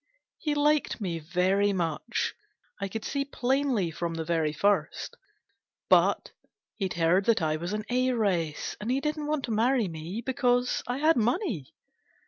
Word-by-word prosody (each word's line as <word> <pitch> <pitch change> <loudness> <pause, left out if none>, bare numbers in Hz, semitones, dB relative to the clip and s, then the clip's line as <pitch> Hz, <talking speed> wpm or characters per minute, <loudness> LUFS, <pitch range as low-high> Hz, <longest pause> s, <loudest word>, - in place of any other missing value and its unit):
He 300 -2 -1
liked 295 -1 +2
me 175 -6 -2
very 185 +5 +1
much 175 +5 -1 0.5
I 200 - -2
could 220 +3 -5
see 280 0 -1
plainly 260 - 0
from 165 +1 -3
the 160 -1 -3
very 160 -2 +1
first; 200 +7 0 0.7
but - - +4 0.5
he'd 190 -3 -2
heard 170 +3 +3
that 225 -7 +3
I 155 0 +1
was 175 +4 -4
an 210 0 -3
heiress, 215 -11 0
and 210 - -3
he 260 +2 +2
didn't 300 +1 -2
want 300 -2 -1
to 235 - -5
marry 230 +1 +2
me, 170 +7 -6
because 245 -1 +1
I 245 +1 -1
had 310 +2 +3
money. 235 - -1
210 Hz, 155 wpm, -28 LUFS, 170-255 Hz, 0.7 s, but